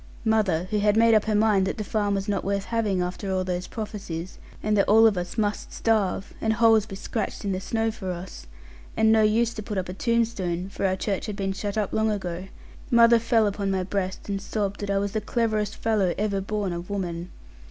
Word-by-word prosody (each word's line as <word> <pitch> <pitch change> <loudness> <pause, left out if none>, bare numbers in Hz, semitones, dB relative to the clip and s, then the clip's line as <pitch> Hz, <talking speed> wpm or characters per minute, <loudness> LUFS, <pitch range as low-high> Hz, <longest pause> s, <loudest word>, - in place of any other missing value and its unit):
Mother, 210 -7 +2
who 210 - +1
had 210 +1 +3
made 230 0 +5
up 215 -1 +4
her 215 -1 +1
mind 205 -3 +3
that - - -3
the 215 - -2
farm 205 -1 0
was 195 0 -3
not 200 -2 -1
worth 200 0 -1
having 210 -6 0
after 185 +2 -4
all 185 0 0
those 180 0 -3
prophesies, 195 -6 -6 0.2
and 215 0 +2
that 200 - +2
all 220 +2 +7
of 220 -2 +5
us 180 +4 -4
must 205 -2 -1
starve, 205 -3 0
and 220 0 +2
holes 225 -1 +4
be 195 - -7
scratched 215 +2 -4
in 200 - 0
the 185 - -1
snow 225 +2 0
for 195 -4 -6
us, 175 - -7 0.5
and 220 0 +4
no 220 0 +5
use 225 +2 +2
to 215 - -6
put 210 -1 -5
up 185 -1 -2
a - - -4
tombstone 195 -5 -1
(for 195 - -1
our 185 - +1
church 195 +1 -2
had 210 - -4
been 195 -1 -2
shut 205 +1 -4
up 210 -2 -1
long 220 0 +2
ago) 185 -3 -3 0.4
mother 235 -1 +6
fell 230 -1 +3
upon 200 -1 -1
my 190 -1 0
breast, 190 0 -3
and 200 -1 -2
sobbed 205 -1 -2
that 205 - -4
I 200 - +1
was 200 0 -1
the 215 - -1
cleverest 215 -2 -1
fellow 205 -6 +1
ever 200 -1 0
born 200 -2 -2
of 175 +2 -6
woman. 180 -3 -3
205 Hz, 230 wpm, -25 LUFS, 190-220 Hz, 0.5 s, all